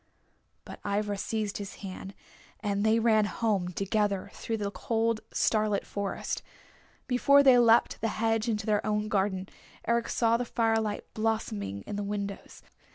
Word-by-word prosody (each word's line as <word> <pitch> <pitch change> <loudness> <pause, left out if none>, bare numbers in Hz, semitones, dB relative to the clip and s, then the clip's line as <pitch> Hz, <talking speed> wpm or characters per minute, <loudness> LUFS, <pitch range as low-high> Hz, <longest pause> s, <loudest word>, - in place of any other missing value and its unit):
But - - -9
Ivra 205 0 -1
seized 210 +1 -3
his 200 -1 -6
hand, 190 +1 -7 0.4
and 205 -1 -1
they 220 +1 +4
ran 220 -2 +4
home 205 -4 0
together 195 +1 -1
through 225 - -3
the 200 -1 -3
cold, 225 +1 0
starlit 215 -2 +1
forest. 200 -1 -3 0.6
Before 280 +3 +5
they 260 -3 +7
leapt 230 0 +4
the 225 - +1
hedge 225 +1 +1
into 215 -2 -1
their 210 -2 +1
own 210 0 -1
garden 190 -2 0 0.4
Eric 235 +1 +1
saw 230 -1 +2
the 245 - -1
firelight 225 -3 0
blossoming 105 - -2
in 205 - -5
the 205 - -2
windows. 200 -1 -5
215 Hz, 150 wpm, -29 LUFS, 200-225 Hz, 0.6 s, they